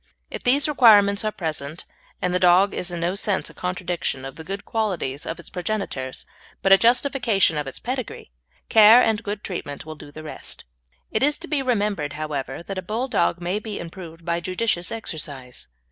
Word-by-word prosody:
If - - -5
these 275 +4 +4
requirements 210 -8 +6
are 215 - 0
present 155 -3 -4 0.4
and 180 0 +1
the 180 - +2
dog 185 +2 +5
is 180 - -2
in 175 -1 -4
no 175 +2 0
sense 200 -1 0
a - - -18
contradiction 175 -6 -3
of 135 - -7
the 160 - -9
good 195 +4 -6
qualities 180 -11 -2
of 165 - -4
its - - -10
progenitors, 180 -9 -3 0.4
but 195 - +3
a 195 - +10
justification 235 - +3
of 150 -2 -2
its 135 - -5
pedigree, 255 - -5 0.4
care 220 +3 +8
and 220 -1 +1
good 205 -1 -5
treatment 145 -7 -5
will 155 - -6
do 150 -1 -12
the 155 +1 -10
rest. 155 - -7 0.5
It 220 - 0
is 290 +2 +3
to 345 - -9
be 300 -4 0
remembered, 205 - 0
however, 150 -1 -4
that 195 +1 -5
a - - -4
Bulldog 215 -3 0
may 180 +4 -1
be 215 -1 -6
improved 165 -1 -9
by 170 0 0
judicious 185 0 -1
exercise. 145 - -6
185 Hz, 190 wpm, -23 LUFS, 160-215 Hz, 0.5 s, a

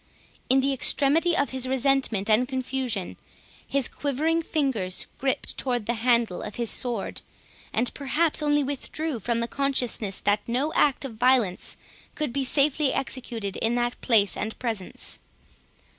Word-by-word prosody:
In 265 +1 +5
the 275 +1 +1
extremity 295 +6 +3
of 280 -4 +1
his 260 -1 0
resentment 260 -6 +1
and 225 +3 +3
confusion, 255 -6 -3 0.5
his 275 -3 +1
quivering 310 +4 0
fingers 260 - -1
griped 270 0 -1
towards 245 -4 -1
the 235 - 0
handle 235 -4 +1
of 210 - -6
his 235 -2 -2
sword, 240 -5 -1 0.5
and 235 +2 0
perhaps 300 +3 +1
only 295 -1 +2
withdrew, 285 0 -4
from 230 +2 -1
the 235 - -1
consciousness 245 -7 0
that 205 +1 +2
no 260 +6 0
act 280 -1 +2
of 230 -5 -7
violence 240 -6 +2 0.4
could 300 -6 -2
be 275 0 0
safely 280 +1 +3
executed 235 -7 -3
in 230 +2 +1
that 240 0 -1
place 210 -5 +3
and 220 +1 -4
presence. 220 -7 -2
255 Hz, 145 wpm, -26 LUFS, 230-275 Hz, 0.5 s, In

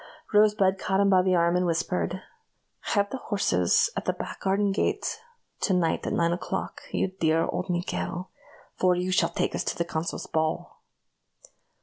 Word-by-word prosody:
Rosebud 205 -2 +4
caught 190 +1 0
him 200 0 +4
by 185 -1 +6
the 185 0 +2
arm, 170 0 +3
and 180 - +2
whispered: 175 +2 -1 0.7
"Have 200 0 +2
the - - -3
horses 90 - +2
at - - -3
the - - +1
back - - -7
garden 200 +1 +1
gate 200 - -1 0.4
to 190 - +1
night 165 -3 0
at - - -1
nine 170 0 +2
o'clock, 175 - -4
you - - 0
dear 160 0 +3
old 180 - -3
Miguel, 180 +1 -3 0.4
for 180 -1 +3
you 180 +1 -1
shall 170 -2 +3
take 170 - -1
us - - -1
to - - -2
the 170 - 0
consul's 165 0 -3
ball." 160 0 -2
180 Hz, 175 wpm, -27 LUFS, 170-195 Hz, 0.7 s, by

